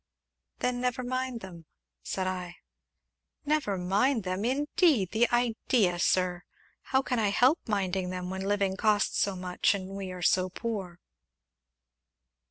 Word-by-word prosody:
"Then 250 -1 -1
never 250 0 -1
mind 255 -1 -3
them," 170 -4 -11 0.3
said 185 - -3
I. 180 -2 -4 0.9
"Never 290 -10 0
mind 205 +7 +1
them, 185 +2 -2
indeed 275 - +2
the 230 +2 +3
idea, 230 -6 +1
Sir! 180 0 +1 0.4
How 265 0 +2
can 250 -2 -1
I 210 -2 +2
help 250 +9 +4
minding 190 -3 -1
them 180 0 -4
when 190 0 -4
living 195 -1 0
costs 210 0 +2
so 200 -1 +1
much 180 +1 +1
and 190 -1 -6
we 185 -2 -6
so 185 +2 +3
poor?" 190 -4 -5
200 Hz, 135 wpm, -29 LUFS, 185-245 Hz, 0.9 s, help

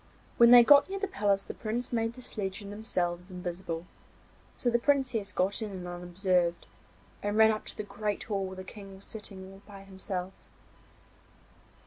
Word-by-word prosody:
When 235 0 +8
they 245 0 +10
got 285 +5 +7
near 390 - -3
the 400 +1 -2
palace 200 - +1
the - - -7
Prince 235 +3 -4
made 225 0 0
the 255 +1 -10
sledge 200 -2 -3
and 200 - -8
themselves 180 -4 -2
invisible, 175 -2 -5 0.7
so 240 - +1
the 235 - +3
Princess 255 -6 +1
got 190 +3 0
in 195 -4 -5
unobserved, 175 0 0 0.6
and 205 +1 -1
ran 220 0 +7
up 215 - -3
to - - -8
the 210 - -3
great 210 0 -3
hall 195 -3 -2
where 190 - -7
the 185 - -7
King 195 0 -10
was 195 - -14
sitting 200 -3 -7
all 195 - -15
by 200 -2 -11
himself. 190 -1 -5
200 Hz, 175 wpm, -30 LUFS, 185-225 Hz, 0.7 s, they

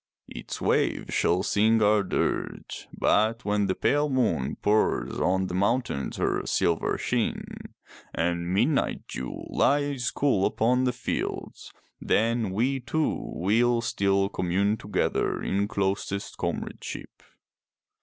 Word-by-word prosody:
Its - - -7
waves - - 0
shall 90 +2 +2
sing 110 +3 +3
our 105 0 +4
dirge, 100 - -3
but 110 +2 +1
when 105 -1 +1
the 95 - 0
pale 145 +1 +1
moon 85 - 0
pours 105 +1 +1
on 95 +1 +1
the 90 - -5
mountains 100 - 0
her - - 0
silver 85 -1 0
sheen, - - -1 0.7
and 85 +1 -1
the 85 - -5
midnight 125 +10 +1
dew 65 - -6
lies 145 -3 +1
cool 130 -9 +2
upon 125 +3 +1
the 125 - +2
fields, 125 - -4 0.3
then 115 -1 +1
we 125 +8 0
two 155 +5 0 0.2
will 115 +6 +2
still 100 -3 +1
commune 100 +3 0
together 105 -1 -1
in 100 +1 0
closest 100 -1 -2
comradeship. - - -5
105 Hz, 125 wpm, -26 LUFS, 95-120 Hz, 0.7 s, our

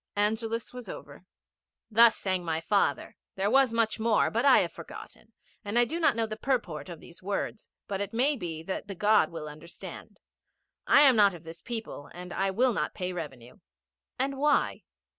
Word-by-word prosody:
Angelus 220 +3 -1
was 250 -1 -8
over. - - -10 0.7
'Thus 230 0 +5
my 175 -4 0
father 165 -5 +1
sang. - - -17 0.2
There 195 +2 0
was 270 -2 +5
much 230 -1 0
more, 220 -1 +2
but 230 +2 0
I 275 - +7
have - - -2
forgotten, - - -11 0.3
and 205 +2 -2
I 240 - +6
do 325 +8 -4
not 320 - +3
know 230 -1 0
the 215 -1 -6
purport 220 - -2
of 170 -3 -8
these 175 +2 -14
words, 200 +2 -4 0.2
but 195 -1 -3
it 200 0 -3
may 265 +6 +2
be 165 - -6
that 190 +3 -5
the 200 - -6
God 210 -2 +3
will 160 -2 -7
understand. 155 +3 -10 0.7
I - - +7
am 270 -4 +7
not 200 -4 +5
of 170 - -12
this 165 +1 -10
people, 225 - -6
and 180 0 -8
I 195 0 0
will 240 +6 +2
not - - -2
pay 180 0 -3
revenue.' 135 - -8 0.6
'And 270 +1 -1
why?' 295 +1 +1
205 Hz, 190 wpm, -28 LUFS, 175-235 Hz, 0.7 s, I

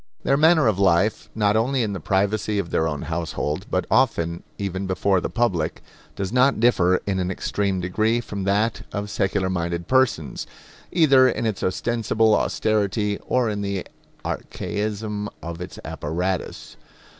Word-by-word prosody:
Their 135 - +3
manner 155 +1 +5
of 105 -4 +2
life, 95 +2 +2
not 105 -1 +2
only 125 +3 +2
in 105 -2 -2
the 95 - -4
privacy 100 +4 0
of 100 -4 -2
their 80 - +1
own 75 -3 -3
household, 80 -2 -3
but - - 0
often 85 +1 +2 0.2
even 95 -1 -3
before 95 0 +1
the - - -3
public, 95 -10 -1 0.3
does 100 +2 -3
not 130 0 +4
differ 95 -6 +3
in 95 -2 -1
an 90 0 -1
extreme 95 0 -1
degree 110 +6 +1
from 100 -4 -5
that 105 +3 +1
of 100 0 -4
secular 95 -1 0
minded 85 -1 -2
persons, 130 - +1 0.4
either 140 -6 +5
in 120 - -2
its 110 -3 -1
ostensible 110 +2 +1
austerity 105 -1 0
or 125 -2 +2
in 105 -1 -2
the 100 -2 -3 0.4
archaism 105 0 -3
of 85 +1 -6
its 90 - -7
apparatus. 90 +4 -3
100 Hz, 155 wpm, -23 LUFS, 90-110 Hz, 0.4 s, manner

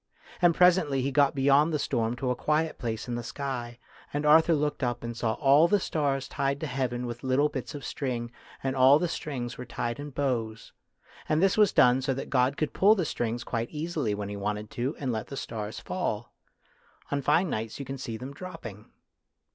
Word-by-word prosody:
And 175 -2 +5
presently 175 -7 +4
he 140 - 0
got 140 +1 +3
beyond 140 +3 +4
the 155 - +1
storm 120 -5 -1
to 125 +1 -1
a - - 0
quiet 155 +4 0
place 110 -1 -3
in 120 - -3
the 120 - -2
sky, 120 -2 -5 0.3
and 145 +1 -2
Arthur 160 +2 +6
looked 150 -1 -1
up 120 -2 -1
and 115 0 -4
saw 110 -1 0
all 140 +6 +5
the 205 +2 +3
stars 140 -6 -1
tied 140 0 -1
to - - -1
heaven 125 -3 -2
with 120 0 -6
little 135 +3 +2
bits 140 -1 -6
of 140 -3 -7
string, 120 -4 -3 0.3
and 135 0 -1
all 135 +2 +7
the 175 - 0
strings 130 -8 -5
were - - -4
tied 120 +1 -3
in 145 +1 -6
bows. 120 -5 -3 0.6
And 155 - +3
this 195 +1 +3
was 210 -2 +5
done 125 +1 +5
so 135 0 -1
that 135 - -6
God 130 +1 +2
could 155 - -1
pull 205 +3 +5
the 185 -5 -1
string 120 -4 -2
quite 115 0 -2
easily 150 -8 -2
when 100 -1 -5
He 105 - -5
wanted 105 +1 -3
to, 130 +6 -2
and 135 -3 -2
let 110 -2 -3
the 140 - -7
stars 110 -3 -5
fall. 120 - -3 0.8
On 145 0 0
fine 155 +6 +2
nights 110 0 -3
you 140 - -6
can 135 +1 -6
see 115 -4 -5
them 130 +4 -7
dropping. 140 - -9
135 Hz, 210 wpm, -28 LUFS, 120-150 Hz, 0.8 s, all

